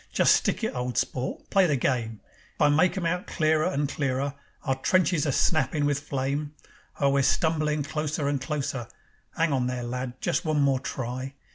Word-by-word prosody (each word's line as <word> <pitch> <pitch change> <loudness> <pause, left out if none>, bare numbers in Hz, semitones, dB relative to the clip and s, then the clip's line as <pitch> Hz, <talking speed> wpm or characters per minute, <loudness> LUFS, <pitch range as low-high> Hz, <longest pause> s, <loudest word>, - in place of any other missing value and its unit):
Just - - +5
stick - - 0
it, 220 - 0
old 125 -1 -3
sport, 130 0 -2
play 195 -2 +5
the 150 - +2
game. 115 -4 -1 0.4
I 150 - +5
make 160 +6 +3
'em 180 - -2
out 180 +2 -1
clearer 155 -1 +2
and 145 -5 0
clearer, 140 -1 -1 0.3
Our 135 - +1
trenches 170 +1 +2
a - - +2
snappin' 145 +1 +1
with 145 -1 +1
flame. 145 +1 -3 0.4
Oh, 140 -1 +3
we're 140 0 +3
stumblin' 155 +1 +1
closer 150 0 -2
and 140 -2 0
closer. 140 -5 -3 0.5
'Ang 165 -2 +2
on 125 -2 +1
there, 125 -1 -3
lad! 125 +1 -4
Just 160 - 0
one 155 -2 +1
more 140 -2 +3
try. 130 +2 -5
140 Hz, 180 wpm, -27 LUFS, 130-155 Hz, 0.5 s, Just